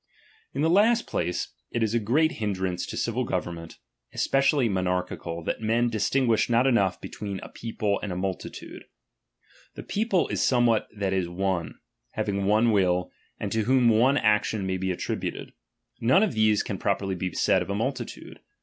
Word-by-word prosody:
In 140 Hz, -, 0 dB
the -, -, +4 dB
last 225 Hz, +5 st, +4 dB
place, 90 Hz, +1 st, -2 dB, 0.2 s
it 115 Hz, -, -1 dB
is 110 Hz, 0 st, 0 dB
a 120 Hz, -, +3 dB
great 145 Hz, +9 st, +2 dB
hindrance 95 Hz, -4 st, -2 dB
to -, -, -6 dB
civil -, -, -1 dB
government, 85 Hz, -1 st, -4 dB, 0.3 s
especially 135 Hz, -1 st, +2 dB
monarchical, 90 Hz, -3 st, -2 dB
that -, -, -3 dB
men 115 Hz, +2 st, +2 dB
:e, -, -, +1 dB
distinguish 115 Hz, +1 st, +1 dB
not 120 Hz, +2 st, +3 dB
enough 110 Hz, -8 st, +2 dB
between 100 Hz, -2 st, -6 dB
a -, -, -9 dB
people 110 Hz, -3 st, -2 dB
and 100 Hz, -, -4 dB
a -, -, -3 dB
^'™ -, -, -3 dB
multitude. 95 Hz, -1 st, -6 dB, 0.9 s
The -, -, -7 dB
people 205 Hz, -4 st, 0 dB
is -, -, -1 dB
somewhat 120 Hz, -4 st, +3 dB
that 100 Hz, -2 st, -1 dB
is 95 Hz, -2 st, 0 dB
owe, 90 Hz, -1 st, -1 dB, 0.4 s
having 100 Hz, -1 st, -1 dB
one 110 Hz, +3 st, +3 dB
will, 90 Hz, -3 st, +1 dB, 0.3 s
and 105 Hz, -, -3 dB
to 110 Hz, -1 st, 0 dB
whom 125 Hz, -1 st, +4 dB
one 125 Hz, +6 st, +4 dB
action 105 Hz, -2 st, +1 dB
may 95 Hz, 0 st, -1 dB
be 95 Hz, +1 st, -2 dB
attributed; 90 Hz, -, -4 dB, 0.5 s
none 130 Hz, -, +4 dB
of 215 Hz, -, 0 dB
these 110 Hz, -1 st, +3 dB
can 100 Hz, -, -5 dB
properly 100 Hz, -1 st, -1 dB
be 90 Hz, 0 st, -3 dB
said -, -, +2 dB
of -, -, -5 dB
a 100 Hz, -, -1 dB
multitude. 125 Hz, +2 st, -4 dB
105 Hz, 175 wpm, -26 LUFS, 95-120 Hz, 0.9 s, the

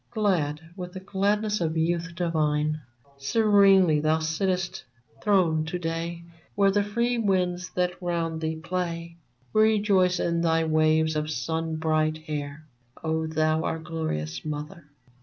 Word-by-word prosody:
Glad 170 Hz, -9 st, 0 dB
with 180 Hz, -2 st, -7 dB
the 190 Hz, -, -6 dB
gladness 205 Hz, +2 st, 0 dB
of 160 Hz, -1 st, -1 dB
youth 165 Hz, +1 st, -1 dB
divine, 155 Hz, -3 st, 0 dB, 0.4 s
Serenely 195 Hz, -1 st, +4 dB
thou 155 Hz, +1 st, +2 dB
sittest 175 Hz, +3 st, -1 dB, 0.4 s
throned 170 Hz, -7 st, +2 dB
to 180 Hz, -, -2 dB
day 165 Hz, 0 st, -4 dB, 0.3 s
Where 200 Hz, -1 st, +4 dB
the 205 Hz, +1 st, +2 dB
free 235 Hz, +4 st, 0 dB
winds 185 Hz, -3 st, 0 dB
that 180 Hz, 0 st, -1 dB
round 165 Hz, -2 st, -2 dB
thee 160 Hz, 0 st, -1 dB
play 170 Hz, 0 st, -4 dB, 0.4 s
Rejoice 205 Hz, -4 st, +3 dB
in 170 Hz, 0 st, 0 dB
thy 165 Hz, -1 st, +2 dB
waves 155 Hz, 0 st, +2 dB
of 155 Hz, 0 st, -1 dB
sun 160 Hz, +1 st, -2 dB
bright 155 Hz, 0 st, +1 dB
hair, 150 Hz, -1 st, -6 dB, 0.4 s
O 160 Hz, 0 st, -1 dB
thou, 155 Hz, 0 st, +1 dB
our -, -, -1 dB
glorious 160 Hz, -, -4 dB
mother 150 Hz, +1 st, -6 dB
165 Hz, 135 wpm, -26 LUFS, 155-185 Hz, 0.4 s, Serenely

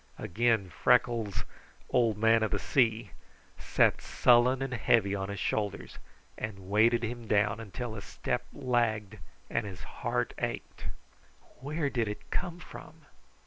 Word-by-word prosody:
Again 110 Hz, -2 st, +1 dB
Freckles' 115 Hz, -2 st, +2 dB, 0.5 s
"old 115 Hz, -4 st, +3 dB
man 115 Hz, +1 st, +4 dB
of 110 Hz, -, +1 dB
the -, -, 0 dB
sea" 115 Hz, -4 st, +1 dB, 0.5 s
sat -, -, +2 dB
sullen 125 Hz, +2 st, +4 dB
and 135 Hz, -1 st, -4 dB
heavy 115 Hz, -4 st, +3 dB
on 95 Hz, 0 st, -3 dB
his 100 Hz, -, -4 dB
shoulders 105 Hz, -2 st, -2 dB, 0.4 s
and 100 Hz, -3 st, -6 dB
weighted 115 Hz, +3 st, +4 dB
him 120 Hz, 0 st, -4 dB
down 105 Hz, +1 st, +2 dB
until 115 Hz, +2 st, -5 dB
his 105 Hz, -2 st, -7 dB
step -, -, -3 dB
lagged 110 Hz, -4 st, -1 dB, 0.3 s
and -, -, -1 dB
his 95 Hz, -2 st, -8 dB
heart -, -, -2 dB
ached. -, -, -4 dB, 0.7 s
"Where 145 Hz, +2 st, -2 dB
did 115 Hz, -4 st, 0 dB
it 105 Hz, -, -7 dB
come 175 Hz, -2 st, -2 dB
from? 160 Hz, -3 st, -12 dB
115 Hz, 140 wpm, -30 LUFS, 105-125 Hz, 0.7 s, man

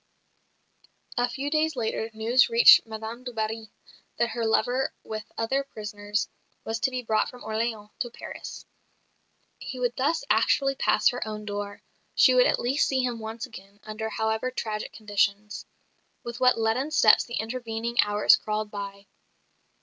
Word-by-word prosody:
A 245 Hz, 0 st, +1 dB
few 280 Hz, +3 st, -4 dB
days 310 Hz, 0 st, +1 dB
later 225 Hz, -2 st, -2 dB
news 235 Hz, +4 st, +3 dB
reached 230 Hz, 0 st, +8 dB
Madame 220 Hz, +2 st, -7 dB
du 250 Hz, -, -5 dB
Barry 220 Hz, 0 st, -3 dB, 0.5 s
that 235 Hz, -, +1 dB
her 230 Hz, -1 st, -2 dB
lover, 245 Hz, +4 st, +1 dB
with 215 Hz, -1 st, -7 dB
other 265 Hz, +5 st, 0 dB
prisoners, 210 Hz, -4 st, -4 dB, 0.4 s
was 225 Hz, 0 st, -3 dB
to 265 Hz, -, +1 dB
be 255 Hz, -1 st, -4 dB
brought 215 Hz, -1 st, +1 dB
from 250 Hz, -, -12 dB
Orleans 220 Hz, -1 st, -3 dB
to 245 Hz, -3 st, -2 dB
Paris. -, -, -9 dB, 0.9 s
He 255 Hz, -, -7 dB
would 245 Hz, -1 st, 0 dB
thus 285 Hz, +4 st, 0 dB
actually 275 Hz, +5 st, +3 dB
pass 215 Hz, -4 st, +3 dB
her 245 Hz, -, -4 dB
own 210 Hz, -1 st, -6 dB
door; 205 Hz, 0 st, -5 dB, 0.3 s
she 255 Hz, -, +6 dB
would 250 Hz, 0 st, +5 dB
at -, -, +2 dB
least 260 Hz, +4 st, +1 dB
see 260 Hz, -1 st, +1 dB
him 240 Hz, -2 st, -2 dB
once 225 Hz, +2 st, -5 dB
again, 200 Hz, -4 st, -13 dB
under 215 Hz, +1 st, -5 dB
however 220 Hz, +3 st, -1 dB
tragic 215 Hz, -4 st, -4 dB
conditions. 205 Hz, 0 st, -1 dB, 0.6 s
With 235 Hz, 0 st, -6 dB
what 255 Hz, -1 st, +4 dB
leaden 225 Hz, +6 st, +1 dB
steps 225 Hz, -8 st, +5 dB
the 235 Hz, -, -6 dB
intervening 230 Hz, 0 st, -1 dB
hours 210 Hz, 0 st, +5 dB
crawled 215 Hz, 0 st, -3 dB
by! 200 Hz, -1 st, -7 dB
225 Hz, 155 wpm, -26 LUFS, 215-250 Hz, 0.9 s, reached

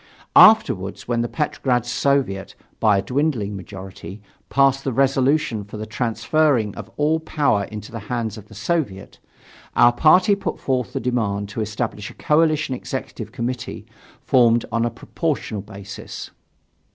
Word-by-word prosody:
Afterwards, 100 Hz, -, +5 dB
when 120 Hz, -1 st, 0 dB
the 120 Hz, -, -2 dB
Petrograd 130 Hz, -5 st, 0 dB
Soviet, 125 Hz, -6 st, 0 dB, 0.2 s
by 105 Hz, -2 st, +4 dB
a -, -, +1 dB
dwindling 125 Hz, -7 st, -1 dB
majority, 95 Hz, +1 st, -9 dB, 0.3 s
passed 135 Hz, 0 st, +3 dB
the 135 Hz, -, -1 dB
resolution 135 Hz, -2 st, +1 dB
for 105 Hz, +2 st, -9 dB
the 110 Hz, -, -5 dB
transfering 115 Hz, +1 st, +1 dB
of -, -, -8 dB
all 155 Hz, +2 st, +2 dB
power 145 Hz, -10 st, +1 dB
into 105 Hz, +1 st, -9 dB
the 115 Hz, -, -5 dB
hands 115 Hz, -4 st, -2 dB
of 105 Hz, -2 st, -11 dB
the 110 Hz, -, -14 dB
Soviet, 110 Hz, -, -3 dB, 0.6 s
our 120 Hz, 0 st, +6 dB
party 180 Hz, -, +5 dB
put 200 Hz, -, -3 dB
forth 125 Hz, -2 st, -1 dB
the 135 Hz, -, -1 dB
demand 110 Hz, -5 st, -1 dB
to 110 Hz, +2 st, -4 dB
establish 110 Hz, -1 st, -3 dB
a -, -, -14 dB
coalition 155 Hz, -2 st, +2 dB
Executive 125 Hz, -4 st, -6 dB
Committee 125 Hz, 0 st, -4 dB, 0.4 s
formed 120 Hz, -2 st, +4 dB
on 115 Hz, +1 st, +1 dB
a -, -, +1 dB
proportional 135 Hz, -, -3 dB
basis. 100 Hz, -1 st, -9 dB
120 Hz, 145 wpm, -22 LUFS, 105-140 Hz, 0.6 s, our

